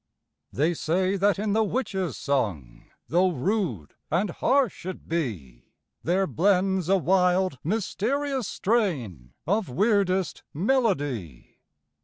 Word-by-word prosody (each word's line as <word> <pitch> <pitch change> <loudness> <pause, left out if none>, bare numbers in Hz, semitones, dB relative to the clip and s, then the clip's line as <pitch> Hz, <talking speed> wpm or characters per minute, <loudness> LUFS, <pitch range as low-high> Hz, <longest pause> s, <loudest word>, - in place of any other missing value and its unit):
They 155 +6 +1
say 185 +4 0
that 200 +1 +2
in 205 0 -1
the 220 +1 +3
witchÆs 195 -6 -2
song, 90 - -2 0.2
Though 180 +3 +3
rude 170 - -2 0.2
and 180 +3 0
harsh 260 +3 +1
it 185 - -7
be, 100 - -4 0.4
There 185 +3 +1
blends 185 +3 +1
a 195 - +5
wild, 180 -4 +2
mysterious 240 - -1
strain 130 - -1
Of 205 +4 0
weirdest 190 - +1
melody. 145 - -1
185 Hz, 110 wpm, -26 LUFS, 145-205 Hz, 0.4 s, a